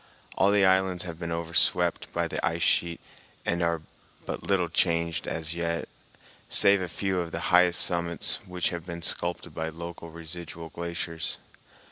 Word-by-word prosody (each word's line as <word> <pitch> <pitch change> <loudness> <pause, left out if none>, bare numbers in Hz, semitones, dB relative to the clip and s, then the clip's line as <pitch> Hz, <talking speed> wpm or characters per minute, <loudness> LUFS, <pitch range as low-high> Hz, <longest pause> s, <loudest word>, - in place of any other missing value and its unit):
All 95 - +4
the 100 -1 +4
islands 95 -1 +3
have 85 -2 -7
been 85 -1 -4
overswept 85 0 +1
by - - 0
the - - -4
ice 85 +1 0
sheet 85 -1 +2 0.5
and 85 0 0
are 85 -2 0 0.4
but - - -4
little 95 -3 +1
changed 85 0 0
as 80 0 -3
yet, 85 0 -2 0.6
save 100 -1 +6
a 90 - -2
few 95 +2 -1
of 85 -1 -3
the 85 - -3
highest 90 -1 +6
summits 85 -1 +2
which 90 -1 -1
have 85 -1 -6
been 85 -1 -5
sculptured 85 -1 0
by 80 +1 -3
local 85 +1 -8
residual 85 0 -7
glaciers. 85 -1 -4
85 Hz, 160 wpm, -28 LUFS, 85-90 Hz, 0.6 s, save